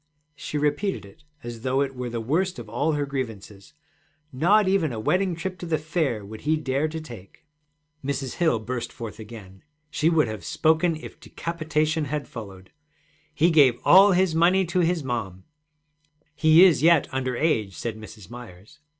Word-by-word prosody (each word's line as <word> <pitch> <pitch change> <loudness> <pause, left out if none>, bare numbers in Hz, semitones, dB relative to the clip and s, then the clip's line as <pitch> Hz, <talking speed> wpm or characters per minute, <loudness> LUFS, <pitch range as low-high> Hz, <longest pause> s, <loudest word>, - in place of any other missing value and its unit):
She 150 +1 -5
repeated 150 - -1
it 100 +10 -18 0.2
as 120 -1 -7
though 130 +2 0
it 135 -1 -1
were 125 -1 -5
the 115 0 -4
worst 170 +11 -1
of 120 -3 -8
all 145 +8 -1
her 145 -1 -1
grievances: 110 -7 -7 0.6
'Not 190 +10 +3
even 190 -6 +1
a 115 - -5
wedding 180 - 0
trip 185 +2 -5
to 175 - -6
the 160 -1 +1
Fair 150 - -2
would 110 +2 -10
he 155 +1 +1
dare 140 0 -1
to 160 +1 -5
take.' 120 -10 -13 0.6
Mrs. 135 -1 -3
Hill 160 -8 +2
burst 120 +2 -5
forth 115 -3 -8
again. 105 -4 -11 0.3
She 155 +1 +1
would 160 -6 +2
have 110 -2 -6
spoken 160 +2 +1
if 155 - -11
decapitation 155 -2 -2
had 145 +1 -4
followed. 95 -5 -10 0.6
'He 170 +3 +3
gave 135 -7 +5
all 195 +2 +7
his 180 -2 +2
money 180 +4 +3
to 175 +2 -1
his 170 -2 +1
mom.' 105 -8 -4 0.9
'He 155 +2 +6
is 160 -8 +4
yet 165 -1 +4
under 130 -1 -2
age,' 110 - 0
said 115 +4 -4
Mrs. 110 -3 -12
Myers. 120 +3 -12
145 Hz, 175 wpm, -24 LUFS, 115-165 Hz, 0.9 s, all